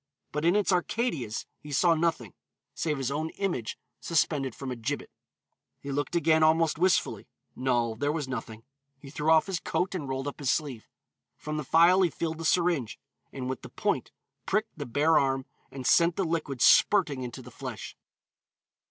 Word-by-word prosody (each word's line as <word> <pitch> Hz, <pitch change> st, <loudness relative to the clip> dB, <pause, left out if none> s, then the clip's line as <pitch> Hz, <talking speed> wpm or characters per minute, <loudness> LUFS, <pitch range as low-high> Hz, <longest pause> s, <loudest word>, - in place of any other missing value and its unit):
But 150 Hz, +2 st, -2 dB
in 175 Hz, +3 st, +4 dB
its 205 Hz, -1 st, +2 dB
Arcadias 175 Hz, -, -1 dB
he 150 Hz, -, -11 dB
saw 170 Hz, +4 st, +4 dB
nothing, 160 Hz, -, -1 dB, 0.4 s
save 155 Hz, -3 st, -1 dB
his 135 Hz, 0 st, -2 dB
own 155 Hz, +3 st, -2 dB
image 170 Hz, -, -2 dB, 0.2 s
suspended 150 Hz, -6 st, 0 dB
from 135 Hz, -2 st, -6 dB
a -, -, -3 dB
gibbet. 125 Hz, +5 st, -4 dB, 0.7 s
He 140 Hz, -, -6 dB
looked 145 Hz, +4 st, -2 dB
again 160 Hz, -1 st, +3 dB
almost 160 Hz, 0 st, +3 dB
wistfully; 185 Hz, 0 st, +1 dB, 0.3 s
no, 120 Hz, -3 st, 0 dB
there 145 Hz, +6 st, -1 dB
was 150 Hz, -3 st, -3 dB
nothing. 115 Hz, -3 st, -6 dB, 0.3 s
He 135 Hz, 0 st, -12 dB
threw 150 Hz, +2 st, -1 dB
off 160 Hz, -1 st, +6 dB
his 190 Hz, -3 st, -2 dB
coat 185 Hz, +2 st, -1 dB
and 150 Hz, -7 st, -4 dB
rolled 135 Hz, +1 st, -3 dB
up 145 Hz, -, -6 dB
his 140 Hz, -3 st, -1 dB
sleeve. 135 Hz, -7 st, -2 dB, 0.5 s
From 155 Hz, 0 st, -5 dB
the 150 Hz, -, -2 dB
phial 170 Hz, +6 st, +5 dB
he 180 Hz, -, +4 dB
filled 160 Hz, +1 st, -4 dB
the 165 Hz, -, -5 dB
syringe, 170 Hz, -8 st, +1 dB, 0.3 s
and 130 Hz, -2 st, -5 dB
with 130 Hz, -1 st, -4 dB
the -, -, -10 dB
point -, -, -1 dB, 0.4 s
pricked 215 Hz, +3 st, 0 dB
the 145 Hz, -4 st, -6 dB
bare 150 Hz, +6 st, +3 dB
arm 135 Hz, -1 st, 0 dB, 0.2 s
and 130 Hz, -1 st, -8 dB
sent 170 Hz, +4 st, +4 dB
the 195 Hz, -, 0 dB
liquid 155 Hz, -6 st, -1 dB
spurting 155 Hz, -10 st, +5 dB
into 125 Hz, +1 st, -7 dB
the 125 Hz, -, -12 dB
flesh. 125 Hz, -5 st, -7 dB
150 Hz, 180 wpm, -28 LUFS, 130-165 Hz, 0.7 s, off